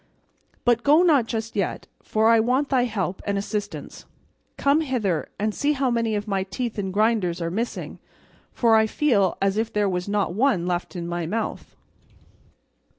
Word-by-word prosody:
But 240 -1 +3
go 300 +7 +5
not 290 -10 +4
just 225 0 -4
yet, 200 -3 -2 0.2
for 220 +1 +1
I 230 0 +6
want 255 +5 +1
thy 255 -3 +2
help 195 -5 -3
and 200 -1 -1
assistance; 205 +1 -5 0.5
come 280 +3 +3
hither, 225 - -1
and 210 +1 -1
see 290 +6 +1
how 270 -3 0
many 230 -2 0
of 205 +1 -3
my 195 -2 0
teeth 210 +4 -4
and 190 -2 -2
grinders 205 -4 +1
are 170 -1 -2
missing, 230 +6 -4 0.5
for 230 -2 +3
I 220 0 +4
feel 215 -8 +1
as 195 +1 +1
if 225 +1 -1
there 210 -1 +1
was 180 0 -2
not 205 -4 0
one 215 -5 +2
left 180 +1 -3
in 170 -1 -4
my 175 -1 -3
mouth." 220 +5 -4
215 Hz, 175 wpm, -24 LUFS, 195-240 Hz, 0.5 s, I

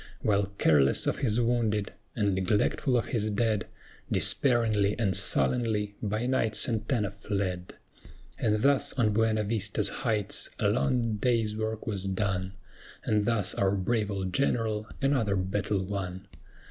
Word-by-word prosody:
While 100 -2 +2
careless 70 -4 +3
of - - -1
his 115 -3 +1
wounded, 115 -4 0 0.2
and 100 -1 +1
neglectful 105 +7 +1
of 115 - 0
his 110 -2 +1
dead, 110 0 0 0.4
Despairingly 110 -6 +2
and 100 -6 0
sullenly 105 - +1
by 110 +3 -2
night 125 -4 0
SANTANA 110 -2 0
fled. 100 -3 -4 0.6
And 105 0 +1
thus 140 -1 +3
on 110 -5 +1
BUENA 110 0 +2
VISTA'S 105 0 0
heights 105 -3 -1
a - - +1
long 115 - 0
day's 115 -1 +1
work 110 0 -3
was 100 -3 -3
done, 95 -1 -2 0.5
And 105 -1 +1
thus 105 -3 0
our 100 0 +1
brave 105 +2 0
old 95 -2 -3
General 110 -5 0 0.2
another 125 -8 +2
battle 95 +1 -1
won. 95 -1 -5
105 Hz, 135 wpm, -28 LUFS, 100-115 Hz, 0.6 s, careless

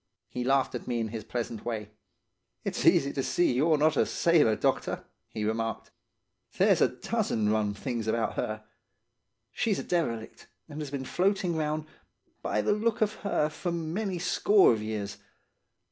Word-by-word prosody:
"He 125 - -3
laughed 135 +1 +2
at - - -6
me 120 -1 -1
in 110 -1 -2
his 110 -1 -5
pleasant 115 0 -4
way. 110 -3 -4 0.7
"'It's - - -1
easy 140 0 +4
to 135 - -1
see 175 +2 +2
you're 155 +5 +3
not 155 +1 +3
a - - +3
sailor, 155 -10 +3
doctor,' - - -1 0.3
he 105 -1 -3
remarked. 115 +1 -2 0.7
'There's - - +4
a - - +6
dozen 105 -2 -1
rum 105 -1 +1
things 120 -1 -3
about 115 +1 0
her. 110 0 -3 0.9
She's 215 -4 0
a - - -3
derelict, 120 -11 -2 0.2
and 155 -1 -7
has 150 - -5
been 135 -1 -4
floating 190 +1 +1
round, 155 0 -1 0.6
by 105 - 0
the - - +3
look 225 +2 0
of 215 0 +2
her, 200 -7 0
for 175 +3 -4
many 170 +4 -2
a - - -4
score 195 - +4
of 110 - -3
years. 105 -2 -4
135 Hz, 170 wpm, -29 LUFS, 110-170 Hz, 0.9 s, a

